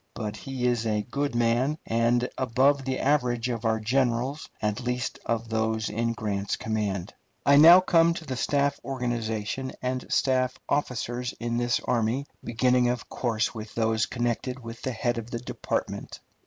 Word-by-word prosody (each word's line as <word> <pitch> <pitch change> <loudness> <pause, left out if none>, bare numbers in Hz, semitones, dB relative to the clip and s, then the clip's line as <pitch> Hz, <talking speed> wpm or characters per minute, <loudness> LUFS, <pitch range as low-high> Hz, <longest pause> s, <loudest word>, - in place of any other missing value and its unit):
But 105 -2 -4
he 130 +2 -4
is 120 -2 +1
a 105 -1 0
good 140 -3 -1
man, 120 +5 +2
and 115 +2 +2
above 130 +3 +2
the 130 -1 -1
average 125 -4 +1
of 115 -2 -3
our 110 0 +2
generals, 125 +4 0
at 105 +2 -1
least 125 0 -2
of 115 0 -1
those 110 0 0
in 115 +2 0
Grant's 100 -4 -2
command. 105 -4 -2 0.3
I 140 0 +6
now 170 +5 +10
come 170 -2 +4
to 165 - -7
the 130 - -3
staff 140 +2 +1
organization 120 -1 -3
and 130 0 -3
staff 130 -1 +2
officers 125 -3 -2
of 120 0 -2
this 120 0 +1
army, 120 +3 0 0.2
beginning, 125 +1 +2
of 120 -1 -3
course, 115 -3 -1
with 110 -1 -8
those 110 -1 +1
connected 125 +1 -2
with 115 0 -8
the 130 - -2
head 120 0 -1
of 115 +1 -8
the 120 - -3
department. 120 - -4
120 Hz, 165 wpm, -27 LUFS, 115-130 Hz, 0.3 s, now